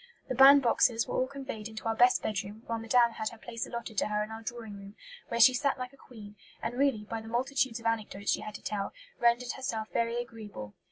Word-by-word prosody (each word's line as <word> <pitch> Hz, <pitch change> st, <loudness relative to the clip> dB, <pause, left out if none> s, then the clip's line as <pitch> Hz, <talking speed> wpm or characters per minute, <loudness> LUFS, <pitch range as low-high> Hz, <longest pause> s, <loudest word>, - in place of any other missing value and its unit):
The -, -, 0 dB
band 275 Hz, +1 st, +8 dB
boxes 230 Hz, -1 st, +3 dB
were -, -, -4 dB
all 255 Hz, -, +1 dB
conveyed 265 Hz, -6 st, -6 dB
into 220 Hz, -1 st, -8 dB
our 225 Hz, -, +1 dB
best 245 Hz, +2 st, +4 dB
bedroom, 210 Hz, +1 st, -4 dB
while 230 Hz, -1 st, -3 dB
Madame 235 Hz, +1 st, +3 dB
had 220 Hz, -1 st, -3 dB
her 230 Hz, -, -13 dB
place 230 Hz, 0 st, -5 dB
allotted 235 Hz, -3 st, -4 dB
to -, -, 0 dB
her 210 Hz, 0 st, 0 dB
in 215 Hz, -, -8 dB
our 220 Hz, 0 st, -7 dB
drawing 225 Hz, -2 st, -6 dB
room, 200 Hz, +1 st, -11 dB, 0.3 s
where 235 Hz, -, -2 dB
she 235 Hz, +3 st, +8 dB
sat 275 Hz, +2 st, 0 dB
like 255 Hz, +1 st, -6 dB
a -, -, -15 dB
queen, 215 Hz, -6 st, -13 dB, 0.2 s
and -, -, -3 dB
really, 260 Hz, -4 st, +1 dB
by 225 Hz, 0 st, -4 dB
the 220 Hz, -, -11 dB
multitudes 250 Hz, +1 st, 0 dB
of 230 Hz, -, -15 dB
anecdotes 215 Hz, -3 st, -1 dB
she -, -, 0 dB
had 215 Hz, 0 st, -7 dB
to -, -, -9 dB
tell, 200 Hz, -2 st, -3 dB, 0.3 s
rendered 240 Hz, +1 st, +2 dB
herself 230 Hz, -5 st, -4 dB
very 235 Hz, 0 st, 0 dB
agreeable. 210 Hz, -, -8 dB
230 Hz, 235 wpm, -30 LUFS, 215-245 Hz, 0.3 s, band